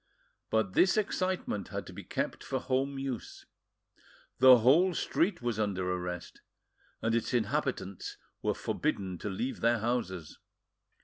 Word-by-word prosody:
But 110 -4 +1
this 185 +3 +4
excitement 185 - -1
had - - -5
to - - -10
be - - -8
kept - - -3
for - - -2
home 135 +2 -1
use: 135 -4 -5 0.9
the 130 0 +9
whole 160 +10 +5
street 170 -5 0
was 120 -3 -1
under 95 -4 0
arrest, 90 -1 -5 0.6
and 115 - +1
its 115 +2 0
inhabitants 120 -5 -2 0.2
were - - 0
forbidden 95 -3 -2
to 105 - -4
leave 120 +7 -3
their 115 +1 +4
houses. 105 -8 -2
120 Hz, 135 wpm, -31 LUFS, 100-135 Hz, 0.9 s, the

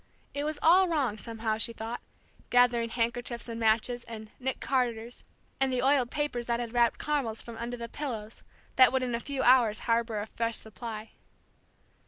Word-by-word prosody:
It 285 +1 -2
was 305 0 -2
all 365 +4 +7
wrong, 270 -11 0
somehow, 220 -1 -3
she 230 - -1
thought, 230 +2 -5 0.5
gathering 245 -1 +4
handkerchiefs 235 +1 -2
and 230 -1 -5
matches 230 +2 +2
and 220 -2 -8
"Nick 265 0 -2
Carters" 240 -3 -1 0.4
and 265 0 +2
the 250 -1 0
oiled 265 -3 +3
paper 290 -4 -1
that 235 0 -1
had 235 -1 -4
wrapped 235 -1 +3
caramels 270 -7 -1
from 235 - -8
under 240 +1 -4
the 235 0 -5
pillows 230 -5 -6 0.4
that 255 -1 +8
would 260 0 +1
in 245 -1 -2
a 235 - 0
few 270 +1 -3
hours 240 -4 +5
harbor 230 -2 +1
a 205 - -3
fresh 230 +1 -2
supply. 220 0 -7
235 Hz, 180 wpm, -29 LUFS, 225-255 Hz, 0.5 s, that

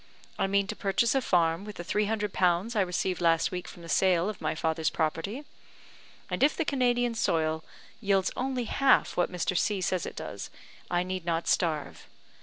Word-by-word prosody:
I - - +2
mean 200 0 +2
to - - -5
purchase 205 +4 +1
a 270 - +2
farm 170 -4 +2
with 210 0 -8
the 175 - -6
three 210 +4 0
hundred 210 -2 -2
pounds 185 +6 +1
I 210 - +3
received 180 0 -1
last 165 -1 +3
week 180 -1 -5
from 170 - -11
the - - -9
sale 180 +2 +3
of 215 - -7
my - - -1
father's 160 0 0
property; 165 - -2 0.8
and - - -3
if 285 +2 +4
the 330 - 0
Canadian 245 -3 +1
soil 160 -7 0 0.4
yields 195 -3 +1
only 260 -1 -1
half 270 +4 +3
what 175 - +1
Mr. 180 0 -1
C 200 +3 +1
says 185 -1 -1
it - - -7
does, - - -6 0.4
I 175 0 +1
need 185 -1 -4
not 165 0 -1
starve. 155 -4 -1
185 Hz, 195 wpm, -28 LUFS, 170-215 Hz, 0.8 s, if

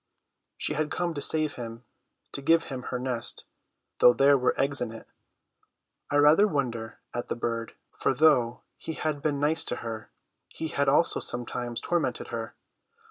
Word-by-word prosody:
She - - -1
had 150 0 -1
come 175 +1 -1
to 145 - -4
save 155 -1 0
him, 115 0 -7 0.5
to 140 - -6
give 165 +3 +4
him 130 - -4
her 125 - -2
nest, 125 -2 -3 0.5
though 125 - +8
there 140 +3 +6
were 125 -2 +1
eggs 140 0 0
in 120 -2 -2
it. 115 - -11 1.0
I 145 - +2
rather 150 +8 +6
wonder 120 - -2 0.2
at 120 - -3
the - - -2
bird, 115 -1 -3 0.2
for - - 0
though 130 -7 +3 0.2
he 160 - -6
had 155 -2 -2
been 145 -1 0
nice 155 +3 +2
to - - -1
her, 110 -1 -5 0.4
he 160 - -5
had 140 -2 +1
also 165 +5 +3
sometimes 120 -1 -3
tormented 175 -1 -1
her. - - -5
140 Hz, 170 wpm, -28 LUFS, 120-155 Hz, 1.0 s, though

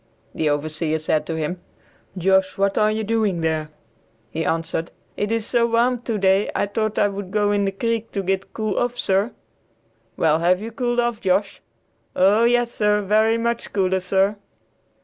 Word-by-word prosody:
The 155 - 0
overseer 155 +2 -1
said 155 -1 -1
to 165 - -2
him, 160 +3 -3 0.6
"Josh, 190 +1 +2
what 195 0 +1
are 215 0 +3
you 220 +1 -1
doing 210 -5 0
there?" 160 -1 -1 0.6
He 165 - -2
answered, 165 0 -2 0.3
"It 205 +1 -2
is 225 -2 0
so 235 -1 +2
warm 235 +1 +1
today 200 -4 +1
I - - +1
taught 215 +1 -2
I 205 - +4
would 200 -1 -6
go 205 +1 +1
in 205 -1 +1
de 195 - 0
creek 230 +3 -2
to 195 - -2
git 190 +1 -2
cool 215 -3 -2
off, 245 0 -1
sir." 195 +5 +1 0.9
"Well, 160 0 +3
have 180 +2 +3
you 225 +3 -6
got - - -25
cooled 240 -1 0
off, 240 -2 0
Josh?" 195 +2 0 0.5
"Oh! 205 +5 +4
yes, 240 0 +2
sir, 210 -2 +1
very 220 +3 +3
much 235 0 -2
cooler, 190 -1 +1
sir." 195 +3 +1
200 Hz, 180 wpm, -22 LUFS, 185-225 Hz, 0.9 s, I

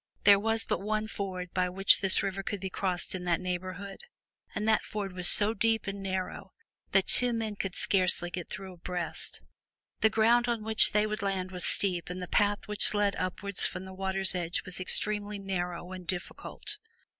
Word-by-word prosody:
There 200 -1 +7
was 225 +1 0
but - - -2
one 215 +1 -1
ford 185 -4 -5
by 180 0 +1
which 195 +2 +5
this 195 -1 +5
river 195 0 -2
could 205 +1 -4
be 190 0 -5
crossed 180 -2 0
in 185 -1 -5
that 170 -1 +1
neighborhood, 185 - -5 0.5
and 215 - -2
that 220 -1 +4
ford 200 -3 -5
was 180 -1 0
so 210 +1 +5
deep 225 0 +1
and 195 0 -5
narrow 190 -1 -4 0.4
that - - +3
two 245 -1 +6
men 220 -2 -3
could 195 -2 -4
scarcely 180 -2 +1
get 175 -1 -6
through 190 -1 -7
abreast. 175 -1 -6 0.6
The 220 - +4
ground 230 +3 +3
on 235 -3 -1
which 220 0 +4
they 210 0 +3
would 215 +1 -3
land 190 -2 -2
was 180 -1 -5
steep 180 -4 +2
and 180 +1 -5
the 180 - -5
path 205 +2 +1
which 210 0 0
led 205 -1 +1
upwards 185 +2 0
from 180 +1 -7
the 190 - -9
water's 190 0 0
edge 175 -1 -2
was 185 -1 -4
extremely 210 +2 +1
narrow 180 -2 -4
and 185 -2 -9
difficult. 190 - -5
195 Hz, 190 wpm, -29 LUFS, 180-210 Hz, 0.6 s, There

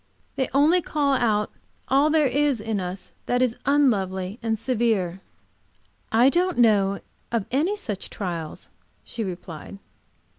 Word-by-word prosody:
They 265 - -1
only 310 +6 +4
call 290 -4 0
out 215 -5 +1 0.4
all 275 +3 +4
there 310 -1 +3
is 280 -1 +1
in 215 -1 -2
us 180 +1 -6 0.2
that 245 +1 +2
is 245 -2 0
unlovely 200 -8 +1
and 225 -1 -1
severe." 220 -6 0 0.9
"I 235 +3 +5
don't 355 +5 +2
know 205 -4 +3 0.3
of 230 -4 0
any 315 +11 +1
such 210 - -5
trials," 170 -5 -5 0.3
she 230 - -5
replied. 180 -1 -7
230 Hz, 135 wpm, -24 LUFS, 195-275 Hz, 0.9 s, I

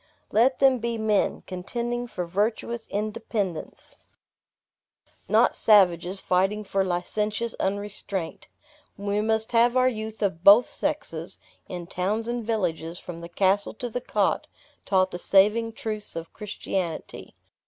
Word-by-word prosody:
Let 250 +5 +4
them 265 -2 +4
be 235 0 -2
men, 220 -2 +1
contending 240 +6 -3
for 180 -6 -4
virtuous 220 +5 -1
independence; 210 -4 -4 1.3
not - - +4
savages, 185 -3 +4
fighting 195 +4 +1
for 195 -1 0
licentious 210 +5 -1
unrestraint. 200 -3 -3 0.5
We 200 +1 -1
must 220 0 0
have 240 +1 +4
our 255 0 +5
youth 220 -3 -3
of 180 -4 -1
both 205 +6 +8
sexes, 280 - -3 0.3
in 175 -1 -5
towns 200 +6 -2
and 240 0 -2
villages, 175 -7 -2
from 170 -1 -8
the 170 - -8
castle 195 +4 +1
to 245 +1 -5
the 245 - -3
cot, - - 0 0.4
taught 190 -1 +3
the 175 - -5
saving 210 +5 +3
truths 215 -2 -5
of 165 0 -6
Christianity. 190 -5 -5
210 Hz, 130 wpm, -26 LUFS, 185-230 Hz, 1.3 s, both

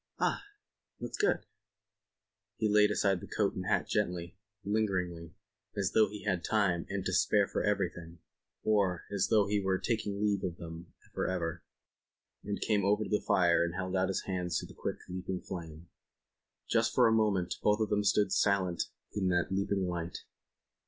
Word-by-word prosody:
"Ah! - - +1 0.6
That's - - -5
good." 415 0 +1 1.1
He 110 - +1
laid 105 0 +5
aside 100 -2 +2
his - - -10
coat - - +1
and - - -5
hat - - +1
gently, 85 -1 -1 0.3
lingeringly, 90 -6 -1 0.4
as 100 -1 0
though 110 -2 +4
he 105 0 -8
had 95 -4 0
time 100 -6 +1
and 95 -1 -3
to 95 - -1
spare 100 +2 +3
for - - -2
everything, 85 -5 -1 0.5
or 100 -5 +1
as 100 -2 +1
though 110 -3 +4
he 105 +1 +1
were 95 -1 +1
taking 105 -2 -2
leave 100 -2 +1
of 85 -2 -3
them 85 +1 -9 0.2
for - - -1
ever, 85 -2 -2 0.8
and 100 0 -3
came 105 -2 +2
over 105 +2 +2
to - - -6
the 105 - +2
fire 85 -2 +3
and 85 +1 -2
held 95 0 -2
out 95 0 +2
his 95 - -2
hands 90 -2 -2
to - - -3
the - - -12
quick, - - -4
leaping 90 0 -4
flame. 80 -1 -7 0.8
Just - - +1
for - - +6
a - - +4
moment 100 -5 +2
both 105 +1 +3
of 110 -2 0
them 105 0 +2
stood 100 -1 +3
silent 95 -4 +2 0.3
in 100 -3 0
that 90 0 +1
leaping 100 0 0
light. 85 -1 -4
95 Hz, 180 wpm, -32 LUFS, 90-105 Hz, 1.1 s, for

